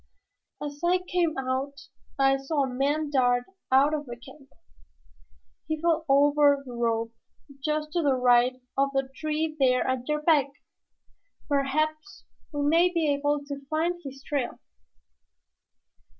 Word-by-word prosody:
"As 290 0 -7
I 355 +1 +4
came 340 -4 0
out 270 +2 -3 0.4
I 270 0 +3
saw 275 +2 -1
a - - -1
man 290 +3 0
dart 245 -3 +2 0.3
out 275 +3 +5
of 295 -2 -3
the 240 - -6
camp. 270 +3 -15 1.2
He 315 0 -2
fell 330 -1 +1
over 285 0 +4
the 250 - -9
rope 230 -1 -1 0.5
just 305 0 -1
to 345 +1 0
the 280 -4 +2
right 250 0 +4 0.2
of 275 0 +2
the 270 -1 -1
tree 310 +1 -2
there 255 -2 +3
at 260 -1 -2
your 300 0 -1
back. 300 -4 +4 1.0
Perhaps 310 +5 -1 0.3
we 290 -1 -2
may 335 +5 +4
be 320 -4 +1
able 290 +1 0
to 280 -1 -7
find 340 +3 -1
his 275 0 -9
trail." 280 -4 -2
285 Hz, 140 wpm, -27 LUFS, 265-310 Hz, 1.2 s, out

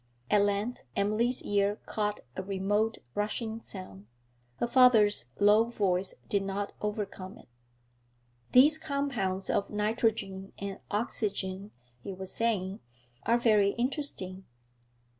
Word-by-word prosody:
At 205 - +5
length 205 +4 0 0.2
Emily's 220 +5 +1
ear 200 0 +1
caught 210 -1 -2
a - - -2
remote 200 +3 0 0.2
rushing 220 +2 -2
sound; 105 - -10 0.5
her 240 - -1
father's 235 - +5
low 210 +2 +6
voice 195 -5 0
did 200 - +1
not 195 +1 -3
overcome 205 -2 -4
it. - - -17 1.0
'These 295 +5 +7
compounds 245 -11 -2
of 200 - 0
nitrogen 210 -2 -1
and 200 0 -5
oxygen,' 205 -2 -2 0.3
he 195 - -6
was 190 0 -6
saying, 205 -4 0 0.5
'are 235 +1 +5
very 210 -4 +4
interesting. 235 -8 -2
205 Hz, 115 wpm, -30 LUFS, 195-225 Hz, 1.0 s, These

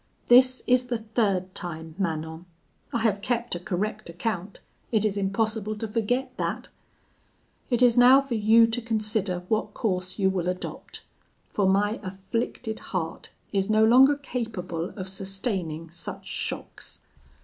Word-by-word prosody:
This 255 +1 +6
is 250 0 +3
the 245 -1 -1
third 210 -5 -1
time, 160 -2 -5
Manon; 160 -1 -3 0.4
I 235 - -1
have 205 -3 +2
kept 240 +1 -1
a 175 - -3
correct 190 +2 -3
account; 190 +2 -4 0.3
it 215 -2 +2
is 205 -2 +1
impossible 215 +2 -1
to 225 - -3
forget 230 +4 -1
that. - - -3 1.0
It 245 -1 +2
is 245 -1 +5
now 250 +2 +8
for 275 -2 -3
you 225 +1 +6
to 230 +2 -1
consider 215 -5 0
what 215 0 -1
course 185 -3 -2
you 190 -2 +3
will 180 -2 -1
adopt; 180 0 -6 0.4
for 195 -2 +1
my 205 +3 +2
afflicted 215 +4 -4
heart 165 -4 -4 0.2
is 195 0 +1
no 215 0 +5
longer 260 +5 +7
capable 220 - -4
of 185 -1 -5
sustaining 190 -4 -3
such 170 - -7
shocks. - - -5
210 Hz, 145 wpm, -26 LUFS, 185-230 Hz, 1.0 s, now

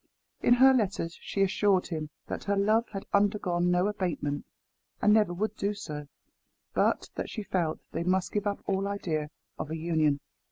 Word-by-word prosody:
In 240 - +5
her 265 +2 +7
letters, 200 -8 0
she 195 - 0
assured 195 -1 +2
him 155 -3 -3 0.2
that - - -5
her 200 0 +1
love 215 +4 +3
had 195 -2 -6
undergone 195 -4 +2
no 180 +1 +3
abatement 175 -8 -2 0.5
and 210 - +5
never 210 -4 +4
would 210 +4 -2
do 205 0 -1
so 150 -8 -6 0.7
but - - +1
that - - -4
she 215 - -5
felt 170 -5 -1
they 165 - -2
must 185 +1 +1
give 210 0 -1
up 200 - -2
all 195 0 0
idea 160 -7 -2 0.3
of 150 - -4
an 160 - -3
union. 155 -3 +1
190 Hz, 175 wpm, -29 LUFS, 165-205 Hz, 0.7 s, her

